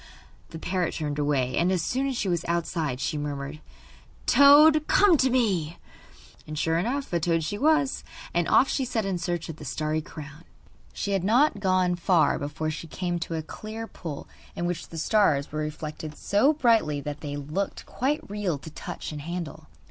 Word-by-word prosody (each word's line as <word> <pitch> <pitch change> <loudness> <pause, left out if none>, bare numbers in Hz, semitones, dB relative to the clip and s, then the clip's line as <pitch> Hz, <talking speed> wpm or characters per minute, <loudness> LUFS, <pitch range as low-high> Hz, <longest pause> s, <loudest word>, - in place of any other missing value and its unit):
The 160 - -8
parrot 180 +1 -1
turned 150 -2 -3
away, 140 -4 +1
and 175 +2 +2
as 180 -3 +1
soon 265 +7 0
as 265 -3 -2
she 205 - -1
was 175 -3 0
outside 165 -5 -1
she 150 +2 -2
murmured: 145 +1 -5 0.6
'Toad, 300 +2 +7
come 400 -4 +5
to 265 -1 +3
me!' 190 -11 +1 0.7
And 155 0 -6
sure 165 +2 +1
enough 260 +4 -2
a 170 - +2
toad 165 0 +1
she 205 +6 -3
was, 300 -2 +2 0.3
and 175 -1 +1
off 265 - +5
she 270 - 0
set 230 -4 -1
in 190 -2 -1
search 175 -1 -2
of 160 -2 -7
the - - -10
starry 155 +2 -2
crown. 150 0 -10 0.5
She 200 - -3
had 195 -3 +1
not 230 +3 +3
gone 185 -2 +2
far 175 -1 +3
before 150 +2 -3
she 165 +1 -6
came 175 +1 -3
to 165 0 -4
a 160 - -3
clear 215 +7 -7
pool, 165 -8 -7 0.3
in 175 - -2
which 175 -1 -3
the 165 - -9
stars 160 -5 +2
were 155 - -3
reflected 155 0 -5
so 210 +9 +3
brightly 230 - +2
that 145 +1 -6
they 145 -1 -4
looked 150 +8 -3
quite 285 +5 -2
real 200 -6 -2
to 155 +3 -11
touch - - -6
and 150 -1 -6
handle. 170 +1 -6
170 Hz, 190 wpm, -26 LUFS, 155-215 Hz, 0.7 s, Toad